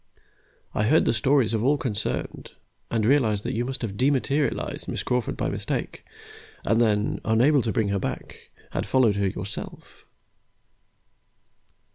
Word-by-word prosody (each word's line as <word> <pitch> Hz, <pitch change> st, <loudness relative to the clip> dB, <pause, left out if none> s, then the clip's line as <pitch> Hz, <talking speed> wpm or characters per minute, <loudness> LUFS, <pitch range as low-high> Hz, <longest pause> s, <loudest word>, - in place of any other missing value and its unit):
I 105 Hz, -, +1 dB
heard 155 Hz, +8 st, +4 dB
the -, -, +3 dB
stories 120 Hz, 0 st, +2 dB
of 110 Hz, -1 st, 0 dB
all 145 Hz, +3 st, +3 dB
concerned, 115 Hz, -8 st, -3 dB, 0.4 s
and 110 Hz, -2 st, 0 dB
realized 110 Hz, -6 st, +3 dB
that -, -, -3 dB
you 115 Hz, -, 0 dB
must 130 Hz, 0 st, -5 dB
have 100 Hz, -3 st, -4 dB
dematerialized 140 Hz, +2 st, 0 dB
Miss -, -, -3 dB
Crawford 125 Hz, -2 st, -1 dB
by -, -, -1 dB
mistake, -, -, -3 dB, 0.6 s
and 115 Hz, +1 st, +3 dB
then, 105 Hz, -2 st, +1 dB
unable 125 Hz, +6 st, +4 dB
to 115 Hz, -, -1 dB
bring 105 Hz, +1 st, 0 dB
her 100 Hz, 0 st, 0 dB
back, -, -, -6 dB, 0.2 s
had -, -, -3 dB
followed 120 Hz, -6 st, +3 dB
her 100 Hz, -1 st, +1 dB
yourself. 95 Hz, +2 st, -7 dB
115 Hz, 145 wpm, -25 LUFS, 105-130 Hz, 0.6 s, heard